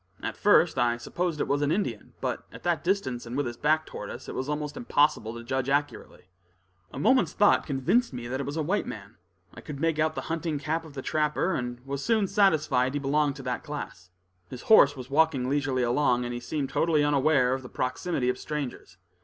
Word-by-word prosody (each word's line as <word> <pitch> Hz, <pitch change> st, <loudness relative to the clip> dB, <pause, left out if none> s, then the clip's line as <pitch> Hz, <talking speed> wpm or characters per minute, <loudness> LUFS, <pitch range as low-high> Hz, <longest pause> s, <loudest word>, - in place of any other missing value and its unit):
At -, -, -3 dB
first 175 Hz, -8 st, +4 dB
I 120 Hz, -1 st, +2 dB
supposed 165 Hz, +7 st, -3 dB
it -, -, 0 dB
was 140 Hz, +1 st, +1 dB
an 145 Hz, 0 st, +1 dB
Indian, 145 Hz, -, -2 dB
but -, -, -3 dB
at -, -, -12 dB
that 175 Hz, -1 st, 0 dB
distance, 130 Hz, -11 st, -1 dB
and 120 Hz, +3 st, -4 dB
with 145 Hz, -, 0 dB
his 120 Hz, -1 st, -4 dB
back 155 Hz, +4 st, +1 dB
toward -, -, -7 dB
us, -, -, -8 dB
it -, -, -6 dB
was 130 Hz, +2 st, -3 dB
almost 150 Hz, 0 st, -3 dB
impossible 145 Hz, -, +1 dB
to 115 Hz, -, -8 dB
judge 130 Hz, +2 st, -2 dB
accurately. 145 Hz, +1 st, -2 dB, 0.7 s
A -, -, -9 dB
moment's 260 Hz, +4 st, +3 dB
thought 205 Hz, -1 st, +3 dB
convinced 145 Hz, -, +1 dB
me 120 Hz, -2 st, -6 dB
that 130 Hz, +2 st, -3 dB
it 140 Hz, -, -3 dB
was 145 Hz, +3 st, -4 dB
a 160 Hz, -, 0 dB
white 195 Hz, +7 st, -1 dB
man. 100 Hz, -1 st, -9 dB, 0.4 s
I -, -, -11 dB
could 145 Hz, -2 st, -8 dB
make 165 Hz, 0 st, 0 dB
out 155 Hz, 0 st, +1 dB
the -, -, -3 dB
hunting 165 Hz, -2 st, -2 dB
cap 160 Hz, +3 st, -2 dB
of 150 Hz, -3 st, -13 dB
the 135 Hz, -, -5 dB
trapper, 155 Hz, +4 st, 0 dB
and 120 Hz, 0 st, -4 dB
was 140 Hz, 0 st, -4 dB
soon 220 Hz, -4 st, +2 dB
satisfied 150 Hz, -10 st, +2 dB
he -, -, 0 dB
belonged 145 Hz, 0 st, +1 dB
to 135 Hz, -, -9 dB
that 125 Hz, -1 st, -3 dB
class. 120 Hz, -11 st, -7 dB, 0.4 s
His 125 Hz, -, -8 dB
horse 145 Hz, -10 st, +6 dB
was 130 Hz, +1 st, -9 dB
walking 145 Hz, -4 st, +2 dB
leisurely 135 Hz, -2 st, 0 dB
along, 125 Hz, 0 st, +2 dB
and 120 Hz, -, -4 dB
he 120 Hz, -, -4 dB
seemed 140 Hz, +2 st, -3 dB
totally 160 Hz, -3 st, +2 dB
unaware 140 Hz, -3 st, +3 dB
of 130 Hz, -, -3 dB
the 125 Hz, -, -10 dB
proximity 130 Hz, +1 st, -2 dB
of 125 Hz, 0 st, 0 dB
strangers. 145 Hz, -11 st, -5 dB
145 Hz, 220 wpm, -27 LUFS, 125-155 Hz, 0.7 s, horse